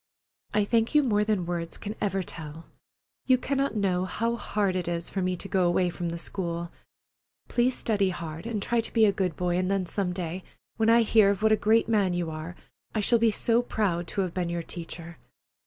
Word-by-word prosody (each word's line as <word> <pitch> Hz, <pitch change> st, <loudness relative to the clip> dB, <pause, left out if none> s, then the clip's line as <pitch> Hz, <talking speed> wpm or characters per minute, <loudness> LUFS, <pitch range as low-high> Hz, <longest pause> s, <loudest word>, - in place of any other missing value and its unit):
I 210 Hz, -1 st, +3 dB
thank 230 Hz, +5 st, +1 dB
you 300 Hz, -, +6 dB
more 210 Hz, -5 st, +2 dB
than 210 Hz, -4 st, 0 dB
words 170 Hz, -1 st, -3 dB
can 210 Hz, -, -5 dB
ever 195 Hz, -2 st, 0 dB
tell. 160 Hz, -1 st, -8 dB, 0.6 s
You 255 Hz, -1 st, +6 dB
cannot 275 Hz, 0 st, -1 dB
know 185 Hz, -3 st, +1 dB
how 230 Hz, +5 st, -1 dB
hard 205 Hz, -5 st, -1 dB
it 180 Hz, -2 st, -2 dB
is 170 Hz, -1 st, -2 dB
for 195 Hz, -, -2 dB
me 185 Hz, 0 st, 0 dB
to -, -, -5 dB
go 185 Hz, -2 st, +2 dB
away 175 Hz, 0 st, +2 dB
from 170 Hz, 0 st, -4 dB
the 170 Hz, -, -4 dB
school. 170 Hz, -1 st, -4 dB, 0.8 s
Please 245 Hz, +1 st, +2 dB
study 200 Hz, -4 st, +1 dB
hard 165 Hz, +1 st, -6 dB
and 215 Hz, -4 st, -2 dB
try 235 Hz, -1 st, +1 dB
to 225 Hz, -, -8 dB
be 225 Hz, -2 st, +5 dB
a 205 Hz, -, +4 dB
good 185 Hz, -4 st, -1 dB
boy 175 Hz, -1 st, 0 dB
and 185 Hz, 0 st, 0 dB
then 195 Hz, -2 st, 0 dB
some 185 Hz, 0 st, -1 dB
day, 180 Hz, 0 st, -4 dB, 0.3 s
when 225 Hz, 0 st, +3 dB
I 230 Hz, 0 st, +6 dB
hear 215 Hz, -2 st, +5 dB
of 200 Hz, +1 st, -1 dB
what 220 Hz, -, +4 dB
a -, -, +7 dB
great 220 Hz, +2 st, +3 dB
man 200 Hz, -5 st, +2 dB
you 170 Hz, -2 st, -2 dB
are, 155 Hz, +3 st, -6 dB, 0.4 s
I -, -, +2 dB
shall 230 Hz, +3 st, +3 dB
be 230 Hz, 0 st, +4 dB
so 230 Hz, +2 st, +2 dB
proud 185 Hz, -8 st, -1 dB
to 200 Hz, -, -2 dB
have 180 Hz, -3 st, -2 dB
been 180 Hz, -2 st, -1 dB
your 170 Hz, 0 st, -2 dB
teacher. 170 Hz, -1 st, -8 dB
190 Hz, 220 wpm, -27 LUFS, 175-220 Hz, 0.8 s, a